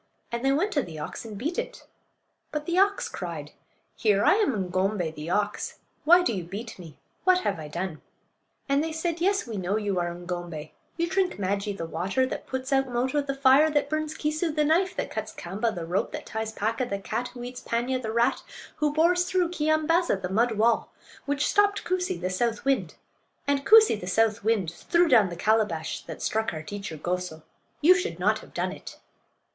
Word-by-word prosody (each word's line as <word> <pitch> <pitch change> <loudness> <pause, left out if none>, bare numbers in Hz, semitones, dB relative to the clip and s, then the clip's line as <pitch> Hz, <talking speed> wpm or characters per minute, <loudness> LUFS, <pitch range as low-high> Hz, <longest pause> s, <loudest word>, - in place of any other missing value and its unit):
And 235 +1 -3
they 270 - +3
went 335 +10 +1
to 285 - +2
the 165 -9 -8
ox 150 +8 -6
and 215 -2 -7
beat 310 - -2
it. - - -6 0.7
But 300 0 -3
the 345 +2 +1
ox 400 +1 +3
cried: - - -6 0.4
"Here! 205 -2 +2
I - - +7
am 405 - +2 0.2
Ng'om'bay, 185 -2 0
the 155 +1 -7
ox. 210 +2 -1 0.3
Why 350 +3 +7
do 240 - +1
you 185 -4 -3
beat 200 +5 -7
me? 160 -5 -11 0.3
What 370 -1 +4
have 165 - -1
I 155 - -6
done?" 170 +1 -4 0.7
And 280 +1 +2
they 325 - -2
said: 335 +1 -2
"Yes, 390 +2 +2
we 225 -4 -5
know 190 +2 0
you 205 -4 -1
are 175 0 -1
Ng'ombay; 175 -3 -6 0.3
you 340 0 +1
drink 375 +1 +1
Maajee, 200 +1 -1
the 165 - -3
water; 185 +10 0
that 260 - -5
puts 260 +1 -3
out 270 0 +3
Moto, 255 +4 0
the 275 -1 -3
fire; 275 +3 +5
that 290 -1 0
burns 310 0 -1
Keesoo, 310 +2 -1
the 300 - +3
knife; 350 +5 +2
that - - -3
cuts 215 0 -4
Kaamba, 205 +6 -2
the 170 -2 -4
rope; 175 +4 -1
that - - -5
ties 220 0 -4
Paaka, 225 +3 -1
the 200 - -1
cat; 240 +5 -3
who 245 -1 -9
eats 245 0 -7
Paanya, 250 +2 -1
the 220 -3 -3
rat; 235 +1 +2 0.4
who 300 -1 +1
bores 345 +4 +3
through 360 -1 +1
Keeyambaaza, 310 - +2
the 180 - -2
mud 230 +4 +2
wall; 225 +2 +2 0.4
which 285 0 +1
stopped 410 0 +3
Koosee, 360 - -1
the 185 +1 -2
south 225 +4 -1
wind; 275 -1 +1 0.5
and 280 -1 0
Koosee, 435 - +7
the 180 - -6
south 220 +2 +2
wind, 210 -6 +1
threw 340 - +2
down 210 - +5
the 170 - -6
calabash 210 -4 0
that - - -7
struck 220 -1 0
our 155 - -5
teacher 200 -3 -6
Goso. 175 -1 -3 0.4
You 335 +5 +8
should 375 +4 -2
not - - +2
have - - -16
done - - -1
it." - - -10
235 Hz, 205 wpm, -27 LUFS, 190-310 Hz, 0.7 s, You